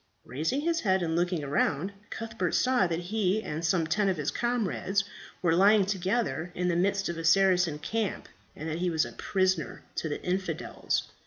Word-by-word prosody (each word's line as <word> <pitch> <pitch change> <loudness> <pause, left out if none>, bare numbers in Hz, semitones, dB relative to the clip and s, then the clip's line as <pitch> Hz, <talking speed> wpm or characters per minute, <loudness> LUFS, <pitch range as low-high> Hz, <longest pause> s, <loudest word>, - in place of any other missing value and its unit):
Raising 160 - -1
his 330 +1 +1
head 190 - +2
and 160 -1 -1
looking 175 -3 0
round, 145 +5 0 0.2
Cuthbert 225 -6 -3
saw 250 -7 +3
that 165 -1 -1 0.2
he 215 0 +1
and 155 +2 -4
some 165 0 +2
ten 200 +5 +1
of 185 - 0
his 150 -1 -1
comrades 210 -5 0 0.4
were 165 -2 +3
lying 200 +2 +5
together 190 -2 -1
in 180 0 0
the 170 - +1
midst 195 +2 +1
of 170 -1 -4
a - - -4
Saracen 180 -2 +4
camp, 210 +6 -3 0.3
and 155 - -6
that 160 +1 -3
he 180 0 +1
was 160 -1 +1
a - - -7
prisoner 185 -5 -1
to 160 - -1
the 145 - -3
infidels. 185 +1 -1
185 Hz, 185 wpm, -28 LUFS, 165-200 Hz, 0.4 s, lying